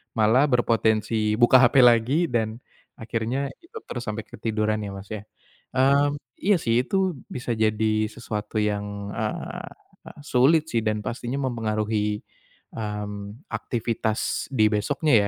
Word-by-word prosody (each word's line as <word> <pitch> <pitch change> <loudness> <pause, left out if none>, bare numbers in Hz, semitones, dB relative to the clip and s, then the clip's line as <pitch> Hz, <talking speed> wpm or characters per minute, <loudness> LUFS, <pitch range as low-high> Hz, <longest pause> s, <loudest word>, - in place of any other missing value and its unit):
malah 115 +6 +4
berpotensi 110 -3 +2
buka 125 +2 +8
HP 120 - +4
lagi 120 +5 +5
dan 110 -1 0 0.4
akhirnya 115 +5 -2 0.2
gitu 445 +6 -11
terus 120 - -5
sampai 105 +1 -3
ketiduran 110 0 -1
ya 100 - -5
Mas 95 +1 -9
ya? 105 -1 -5 0.5
Mmm, 140 +2 +3 0.2
iya 200 -1 +4
sih 120 -5 +2
itu 190 +5 0 0.2
bisa 120 -1 -4
jadi 110 0 +1
sesuatu 105 0 -5
yang, 100 -1 -2
eee, - - -4 0.6
sulit 145 +6 +4
sih 115 -1 +1
dan 105 -1 -1
pastinya 120 +3 -3
mempengaruhi, 110 -2 -1 0.5
mmm, 105 +2 -6
aktivitas 115 -1 -2
di 115 -5 +3
besoknya 140 +8 +1
110 Hz, 125 wpm, -25 LUFS, 105-125 Hz, 0.6 s, buka